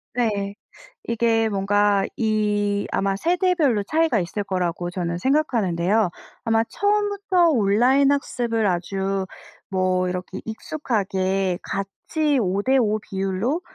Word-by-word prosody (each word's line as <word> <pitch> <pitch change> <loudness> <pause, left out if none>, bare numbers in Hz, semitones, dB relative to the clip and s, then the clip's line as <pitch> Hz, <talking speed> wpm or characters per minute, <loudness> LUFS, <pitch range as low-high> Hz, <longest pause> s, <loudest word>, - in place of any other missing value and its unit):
네. 205 -4 -1 0.5
이게 225 -1 +1
뭔가 200 0 +2
이 210 -2 0
아마 195 0 0
세대별로 335 - +1
차이가 310 0 +1
있을 195 +3 -3
거라고 180 -2 -2
저는 175 -1 -3
생각하는데요. 220 - +1 0.3
아마 225 0 +2
처음부터 405 - +1
온라인 255 +4 +3
학습을 240 -5 -1
아주 190 +2 -1 0.4
뭐 185 -1 +1
이렇게 180 +1 -5
익숙하게 195 - -1
같이 285 +9 -1
5 195 0 0
대 265 +3 +3
5 215 -3 +2
비율로 195 - -2
210 Hz, 245 characters per minute, -23 LUFS, 195-260 Hz, 0.5 s, 온라인